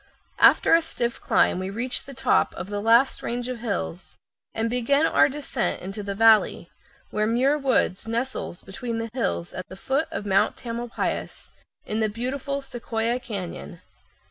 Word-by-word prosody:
After - - +6
a 330 - +7
stiff 240 -7 -2
climb - - +2
we 185 +1 -3
reach 235 +5 -3
the 275 - -10
top 265 - +2
of 190 - -6
the 205 0 -2
last 235 +5 +4
range 240 +1 -3
of 255 -2 -4
hills 195 -5 -4 0.3
and 225 +1 -1
begin 250 +6 +2
our - - +4
descent 275 -3 -2
into 195 +3 -6
the 200 -1 -4
valley, 220 0 +4 0.4
where 215 0 0
Muir 255 +6 +3
Woods 250 -7 +1
nestles 230 -5 -3
between 230 +4 -5
the 230 0 -4
hills 85 - -2
at 185 - -6
the - - -9
foot 270 +9 -1
of - - -5
Mount 195 -1 +2
Tamalpais, 235 0 -4 0.3
in 215 - -2
the 220 -1 +1
beautiful 270 +5 -3
Sequoia 235 -2 -2
Cañon. 185 -6 -7
230 Hz, 165 wpm, -25 LUFS, 205-255 Hz, 0.4 s, a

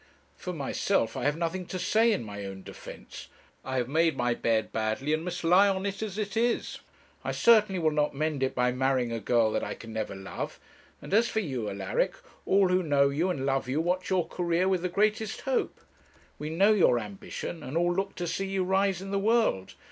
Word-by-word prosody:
For 180 - -6
myself, 140 - 0
I - - -3
have 145 +1 +1
nothing 175 +2 -3
to 185 - -4
say 225 +5 +3
in 205 - 0
my 100 -2 -7
own 95 -1 -7
defence. - - -10 0.4
I 130 0 -3
have 125 -1 0
made 160 +3 +2
my 120 0 +1
bed 115 -2 0
badly, 110 +7 -1
and 155 +1 0
must 180 0 -4
lie 180 +4 +6
on 190 0 0
it 200 0 -3
as 210 -3 -4
it 210 0 -3
is. 235 +1 0 0.4
I - - -2
certainly 215 -4 +4
will 160 -3 +2
not 150 -1 0
mend 155 -1 -1
it 130 - 0
by 125 0 +2
marrying 130 -1 0
a 115 - -2
girl 115 +1 +2
that - - -1
I - - -4
can 115 -1 -10
never 110 -2 -3
love. 95 -1 -6 0.4
And - - -7
as 230 +3 +4
for 220 - 0
you, 130 - -3
Alaric, 100 -1 -1 0.3
all 195 -1 +4
who 180 0 +3
know 140 -4 +3
you 160 +7 0
and 135 -7 -2
love 135 -2 0
you 140 +4 0
watch 180 +3 -1
your 185 -3 +1
career 175 +1 0
with 190 -2 +1
the 180 - -1
greatest 215 +3 0
hope. 265 -1 -1 0.6
We 150 - -4
know 195 +7 +4
your 180 -11 +4
ambition, 105 - -6
and 130 +6 -4
all 175 +1 +2
look 195 +2 -2
to 175 - -3
see 195 +3 -2
you 190 -1 0
rise 190 0 +1
in 195 - -7
the 200 - +1
world. 215 - +1
165 Hz, 220 wpm, -28 LUFS, 130-195 Hz, 0.6 s, lie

